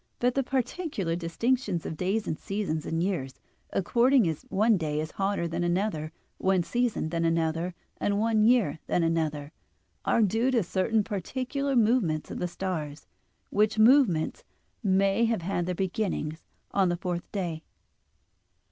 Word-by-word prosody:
But 245 0 +1
the 275 - +2
particular 255 - -2
distinctions 185 +3 -1
of - - -4
days 195 +6 -1
and - - -1
seasons 185 -4 -3
and 165 +1 0
years, 160 -9 -2 0.4
according 240 +3 +3
as 160 -2 -2
one 215 +3 +3
day 155 -4 -1
is 155 0 -3
hotter 195 -3 -1
than 170 +1 -2
another, 175 -3 -1 0.3
one 190 -2 +2
season 240 -6 -1
than 165 0 -1
another, 165 +1 0 0.2
and 200 0 0
one 220 0 +2
year 220 - +3
than 175 - +1
another, 155 -3 -1 0.5
are 230 - +3
due 225 +5 +2
to 240 -5 +2
certain 200 +5 +1
particular 260 - -2
movements 215 -9 +2
of - - -5
the 180 - -1
stars: 165 -5 -4 0.5
which 215 +1 +2
movements 230 - +4 0.4
may 195 +1 +3
have 225 -6 0
had 175 -1 -1
their 180 - -1
beginning 185 -4 -2 0.4
on 190 -2 +2
the 175 - 0
fourth 175 -1 -4
day. 175 -6 -3
190 Hz, 150 wpm, -28 LUFS, 165-225 Hz, 0.5 s, movements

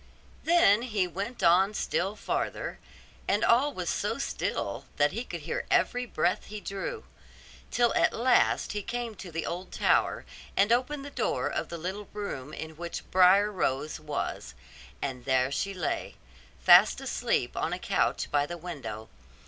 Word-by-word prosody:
Then 320 -11 +5
he 215 -6 0
went 200 +7 -5
on 190 +5 +5
still 200 0 -1
farther, - - -3 0.5
and 205 +3 +2
all 255 +6 +4
was - - -5
so - - -1
still - - -3
that 145 0 +3
he 230 +7 -3
could 170 -9 -7
hear 160 - -4
every 245 0 +2
breath 175 -3 0
he 210 0 -7
drew; 310 - -5 0.7
till 240 -1 +2
at - - +3
last 245 +1 +2
he 210 - -3
came 240 +2 -4
to 185 -3 -8
the 165 0 -3
old 180 +2 -5
tower, - - +2 0.3
and 200 +3 +4
opened 275 +4 +1
the 285 - -8
door - - -1
of - - -3
the 170 - -5
little 190 +5 -5
room 155 -10 -5
in 160 0 -7
which 170 0 -6
Briar 190 +3 +6
Rose 155 -6 -1
was; 150 -2 -4 0.5
and 125 -3 -4
there 130 -1 +2
she 195 +8 -1
lay, 180 -4 -3 0.4
fast - - +7
asleep - - -1
on - - -1
a - - -1
couch - - 0
by 145 0 +2
the 175 - -6
window. 140 -11 -7
190 Hz, 165 wpm, -28 LUFS, 160-230 Hz, 0.7 s, fast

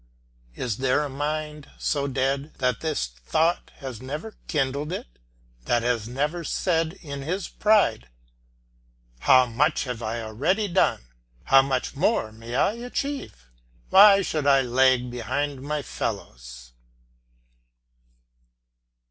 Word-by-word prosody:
Is 115 -5 -3
there 135 +2 +1
a 145 - -4
mind 150 +1 -4
so 140 -2 -1
dead 135 +2 -1
that 125 -1 0
this 155 - -1
thought 65 - -1
has 130 -5 -8
never 150 +11 -6
kindled 145 +1 -1
it, - - -4 0.6
that 120 - +1
has 120 -3 0
never 150 +7 -2
said 165 -1 0
in 140 -3 -6
his 180 +7 -3
pride, 210 - +2 1.1
"How 130 - +6
much 140 +7 +1
have 125 -3 -5
I 115 +1 -3
already 145 - 0
done, 180 - +1 0.4
how 135 0 +6
much 135 0 -2
more 145 - +1
may 115 +2 -8
I 145 - +3
achieve? 245 - -5 0.4
Why 200 0 +8
should 155 -5 -2
I 135 -1 +6
lag 125 0 +3
behind 130 +4 -3
my 150 +1 -3
fellows?" - - -6
135 Hz, 120 wpm, -25 LUFS, 120-155 Hz, 1.1 s, Why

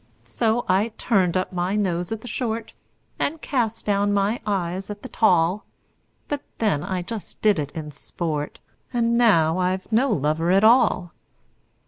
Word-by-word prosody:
So 225 - 0
I 205 +4 +1
turned 185 -6 +2
up 185 - -2
my 180 +2 -1
nose 180 -3 -1
at 225 -1 -3
the 245 - -9
short, 230 -1 -3 0.5
And 320 +3 -1
cast 230 -6 -2
down 205 0 +1
my 205 +4 +1
eyes 190 -1 -2
at 205 - -7
the 260 - -7
tall; 180 -1 +2 0.6
But 290 -1 -3 0.2
then 200 -10 +1
I 185 -2 -3
just 215 +2 -7
did 210 -6 +4
it 145 -2 -3
in 155 -2 -6
sport 150 +1 -4 0.3
And 235 -2 +1
now 180 -8 +4
I've 185 +2 -1
no 245 +5 +3
lover 160 - 0
at 195 +3 +4
all! 220 -6 +4
200 Hz, 160 wpm, -23 LUFS, 175-225 Hz, 0.6 s, did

